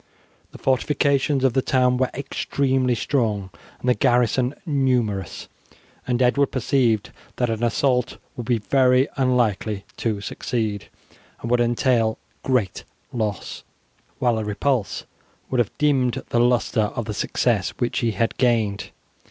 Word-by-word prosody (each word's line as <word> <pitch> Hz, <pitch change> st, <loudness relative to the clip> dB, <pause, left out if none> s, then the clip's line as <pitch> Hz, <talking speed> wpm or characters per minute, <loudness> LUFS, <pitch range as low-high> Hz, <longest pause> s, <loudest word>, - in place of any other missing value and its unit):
The -, -, -11 dB
fortifications 140 Hz, +1 st, +1 dB
of 130 Hz, -3 st, +3 dB
the 130 Hz, -, +2 dB
town 125 Hz, -1 st, +2 dB
were 130 Hz, 0 st, +1 dB
extremely 130 Hz, -1 st, 0 dB
strong 110 Hz, -8 st, -1 dB, 0.3 s
and -, -, -6 dB
the 125 Hz, -, +5 dB
garrison 125 Hz, +1 st, +2 dB
numerous, 125 Hz, -, 0 dB, 0.6 s
and 120 Hz, -1 st, 0 dB
Edward 140 Hz, +3 st, +3 dB
perceived 120 Hz, -4 st, +1 dB, 0.2 s
that 120 Hz, -2 st, 0 dB
an 115 Hz, +1 st, -3 dB
assault 125 Hz, +1 st, +1 dB, 0.2 s
would 120 Hz, -, -6 dB
be 120 Hz, -2 st, +2 dB
very 130 Hz, +4 st, +3 dB
unlikely 115 Hz, -6 st, 0 dB
to 110 Hz, -3 st, -1 dB
succeed, 105 Hz, 0 st, -3 dB, 0.5 s
and 115 Hz, -, -3 dB
would 125 Hz, 0 st, +3 dB
entail 120 Hz, -1 st, +2 dB, 0.2 s
great 125 Hz, -8 st, 0 dB, 0.3 s
loss, 110 Hz, -4 st, -3 dB, 0.6 s
while 120 Hz, -3 st, +1 dB
a -, -, -2 dB
repulse 105 Hz, +2 st, -1 dB, 0.5 s
would 130 Hz, -, +1 dB
have 120 Hz, -, +2 dB
dimmed 135 Hz, -5 st, +1 dB
the 120 Hz, -, +1 dB
lustre 120 Hz, -3 st, +2 dB
of 120 Hz, -, -2 dB
the 105 Hz, -, -4 dB
success 105 Hz, -1 st, 0 dB
which 120 Hz, -2 st, -1 dB
he 115 Hz, -2 st, 0 dB
had 115 Hz, 0 st, 0 dB
gained. 110 Hz, -5 st, +1 dB
125 Hz, 135 wpm, -23 LUFS, 110-130 Hz, 0.6 s, the